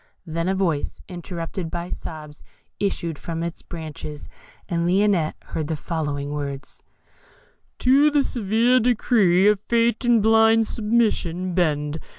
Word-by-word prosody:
Then 165 Hz, +1 st, -2 dB
a 190 Hz, -, +1 dB
voice 170 Hz, -7 st, -1 dB
interrupted 175 Hz, -1 st, -6 dB
by 170 Hz, +1 st, -5 dB
sobs 150 Hz, -2 st, -8 dB, 0.4 s
issued 170 Hz, -6 st, -2 dB
from 165 Hz, 0 st, -4 dB
its 170 Hz, 0 st, -5 dB
branches, 155 Hz, -2 st, -8 dB, 0.4 s
and 170 Hz, -1 st, -1 dB
Lionette 185 Hz, -3 st, +2 dB
heard 155 Hz, -2 st, -4 dB
the 160 Hz, -, -2 dB
following 145 Hz, -3 st, -3 dB
words: 140 Hz, -2 st, -6 dB, 1.0 s
To 275 Hz, +4 st, +5 dB
the 290 Hz, -1 st, +2 dB
severe 235 Hz, +2 st, +2 dB
decree 215 Hz, -6 st, +3 dB
of 210 Hz, -1 st, +4 dB
Fate 235 Hz, +1 st, +2 dB
In 240 Hz, -1 st, +4 dB
blind 225 Hz, +1 st, +4 dB
submission 210 Hz, -6 st, 0 dB
bend. 155 Hz, -3 st, 0 dB
175 Hz, 130 wpm, -23 LUFS, 160-220 Hz, 1.0 s, To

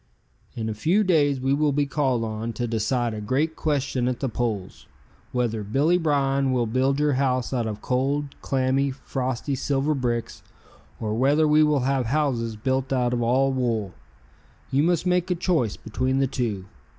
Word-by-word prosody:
"In 110 Hz, -2 st, -3 dB
a 110 Hz, -, -2 dB
few 170 Hz, -, +2 dB
days 145 Hz, -7 st, +2 dB
we 135 Hz, +1 st, +1 dB
will 150 Hz, +1 st, +2 dB
be 145 Hz, +1 st, +1 dB
called 135 Hz, -4 st, 0 dB
on 110 Hz, +1 st, -4 dB
to 120 Hz, +3 st, -2 dB
decide 115 Hz, +1 st, 0 dB
a 105 Hz, -, -5 dB
great 145 Hz, +9 st, 0 dB
question 135 Hz, -4 st, -1 dB
at 125 Hz, -1 st, -1 dB
the 135 Hz, -, -1 dB
polls, 110 Hz, -5 st, -4 dB, 0.4 s
whether 120 Hz, -3 st, -1 dB
Billy 145 Hz, -, +2 dB
Bryan 140 Hz, -4 st, +1 dB
will 125 Hz, -2 st, +1 dB
build 130 Hz, +4 st, +1 dB
your 150 Hz, -1 st, +2 dB
house 130 Hz, -1 st, 0 dB
out 120 Hz, -3 st, 0 dB
of 105 Hz, -1 st, -5 dB
cold, 140 Hz, +3 st, 0 dB
clammy, 135 Hz, +1 st, +1 dB
frosty 130 Hz, 0 st, -3 dB
silver 140 Hz, +3 st, 0 dB
bricks, 120 Hz, -4 st, -2 dB, 0.6 s
or 105 Hz, -1 st, -2 dB
whether 140 Hz, +7 st, +3 dB
we 150 Hz, +1 st, +5 dB
will 150 Hz, -3 st, +3 dB
have 130 Hz, -1 st, 0 dB
houses 125 Hz, -5 st, 0 dB
built 130 Hz, +4 st, -1 dB
out 125 Hz, -2 st, +1 dB
of 120 Hz, -, 0 dB
all 130 Hz, +3 st, +2 dB
wool. 115 Hz, -7 st, -1 dB, 0.8 s
You 135 Hz, -, +3 dB
must 170 Hz, +2 st, +1 dB
make 180 Hz, 0 st, +1 dB
a 180 Hz, -, +1 dB
choice 165 Hz, -, 0 dB
between 130 Hz, +4 st, -1 dB
the 135 Hz, -, +3 dB
two. 115 Hz, -8 st, -3 dB
130 Hz, 175 wpm, -24 LUFS, 120-145 Hz, 0.8 s, we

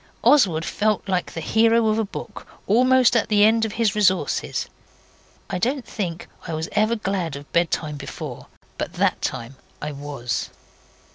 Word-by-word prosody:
Oswald 180 Hz, -, +4 dB
felt 215 Hz, -1 st, 0 dB
like 185 Hz, -2 st, -1 dB
the 165 Hz, -, -5 dB
hero 225 Hz, +5 st, +3 dB
of 215 Hz, 0 st, +2 dB
a -, -, +2 dB
book 200 Hz, -, -8 dB, 0.2 s
'almost 250 Hz, +3 st, +4 dB
at 230 Hz, -, +2 dB
the 205 Hz, -1 st, +5 dB
end 225 Hz, +1 st, +4 dB
of 215 Hz, -, -4 dB
his 220 Hz, -2 st, +1 dB
resources'. 195 Hz, -3 st, +1 dB, 0.8 s
I 180 Hz, -, -3 dB
don't 255 Hz, +5 st, -1 dB
think 175 Hz, -6 st, -4 dB, 0.2 s
I 165 Hz, -, -3 dB
was 160 Hz, +1 st, -3 dB
ever 215 Hz, +2 st, +2 dB
glad 190 Hz, -8 st, -2 dB
of 140 Hz, 0 st, -11 dB
bedtime 160 Hz, -3 st, 0 dB
before, 140 Hz, -, -7 dB, 0.3 s
but -, -, -3 dB
that -, -, +1 dB
time 120 Hz, +3 st, -4 dB, 0.2 s
I 150 Hz, -, -4 dB
was. 140 Hz, -4 st, -4 dB
200 Hz, 160 wpm, -23 LUFS, 160-225 Hz, 0.8 s, the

